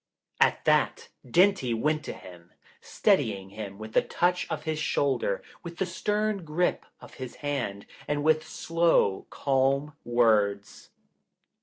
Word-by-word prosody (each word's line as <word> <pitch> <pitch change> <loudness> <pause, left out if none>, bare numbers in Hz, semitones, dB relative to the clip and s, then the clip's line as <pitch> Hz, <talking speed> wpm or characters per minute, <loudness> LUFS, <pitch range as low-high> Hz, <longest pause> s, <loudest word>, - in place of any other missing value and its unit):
At - - +3
that, - - +2
Dinty 170 -3 +3
went 150 +6 0
to - - -4
him, 90 -1 -14 0.3
steadying 95 -1 0
him 100 -2 -7
with 110 +1 -9
the - - +5
touch 180 +1 0
of - - -4
his 155 -1 -2
shoulder, 160 - 0 0.2
with 170 -1 -9
the 190 - 0
stern 210 +2 -1
grip 165 +3 -1
of - - -14
his 130 -2 -6
hand 120 -9 -3 0.2
and 145 0 -1
with 155 0 +3
slow, 165 - +1
calm 140 +2 +1
words. 100 -10 +1
140 Hz, 135 wpm, -27 LUFS, 110-170 Hz, 0.3 s, the